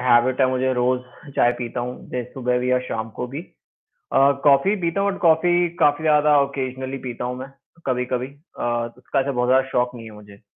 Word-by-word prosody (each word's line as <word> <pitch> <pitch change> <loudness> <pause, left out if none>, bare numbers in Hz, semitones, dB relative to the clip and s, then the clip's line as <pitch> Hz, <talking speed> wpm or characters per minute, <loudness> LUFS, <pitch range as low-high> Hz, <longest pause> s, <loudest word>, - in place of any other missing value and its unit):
Habit 125 +1 +3
है 130 - +5
मुझे 130 0 0
रोज़, 125 +1 +1 0.4
चाय 120 - +4
पीता 120 0 -3
हूँ, 125 +1 -4
जैसे 125 -1 -4
सुबह 125 -1 0
भी 125 +1 0
और 125 0 +2
शाम 110 -2 -4
को 125 - -3
भी। 140 +5 -6 0.5
अ, 135 +1 +2
कॉफी 145 +8 +4
पीता 170 +3 0
हूँ 200 0 +1
बट - - -7
कॉफी, 175 +1 +3
काफ़ी 145 +2 +3
ज़्यादा 150 -1 +4
ओकेज़नली 130 -1 -4
पीता 120 0 -5
हूँ 125 0 -3
मैं, 130 +1 -7 0.4
कभी-कभी 125 -1 -1 0.3
अ, - - -4 0.4
उसका 130 +2 -1
ऐसा 140 +1 -1
बहुत 125 -1 0
ज़्यादा 130 +1 +4
शौक 125 -1 0
नहीं 115 -2 -9
है - - -13
मुझे। 105 -1 -15
130 Hz, 205 wpm, -22 LUFS, 125-140 Hz, 0.5 s, है